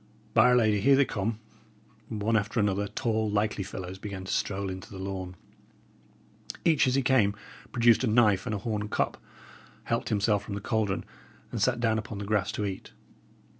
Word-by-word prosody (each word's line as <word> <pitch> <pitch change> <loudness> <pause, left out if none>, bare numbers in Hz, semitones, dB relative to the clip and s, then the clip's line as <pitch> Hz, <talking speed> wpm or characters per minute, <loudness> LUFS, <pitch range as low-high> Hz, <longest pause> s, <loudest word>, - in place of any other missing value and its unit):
By 115 +1 +6
'r 125 - +5
Lady! 110 -4 +3
here 140 +6 +6
they 140 0 +4
come." 110 -1 -2 0.7
One 110 0 0
after 110 +2 0
another, 100 0 +1
tall, 110 0 -1
likely 105 0 0
fellows 95 -1 -7
began 100 -2 -6
to 95 - -3
stroll 100 -1 -1
into 95 0 -8
the 100 - -9
lawn. 95 -1 -5 1.3
Each 160 -5 +4
as 130 - +2
he 135 - +2
came 120 -6 +3 0.4
produced 120 0 +4
a - - +2
knife 110 -3 +3
and 110 - -1
a - - -1
horn 105 0 -3
cup, - - -1 0.6
helped - - -1
himself 105 -1 +2
from 100 -1 -6
the - - -3
caldron, 105 -1 -1 0.5
and - - -3
sat 125 -2 +2
down 110 -2 +2
upon 110 -1 -7
the 100 - -5
grass 105 -2 0
to 105 - -2
eat. 95 -2 -6
105 Hz, 185 wpm, -28 LUFS, 100-115 Hz, 1.3 s, By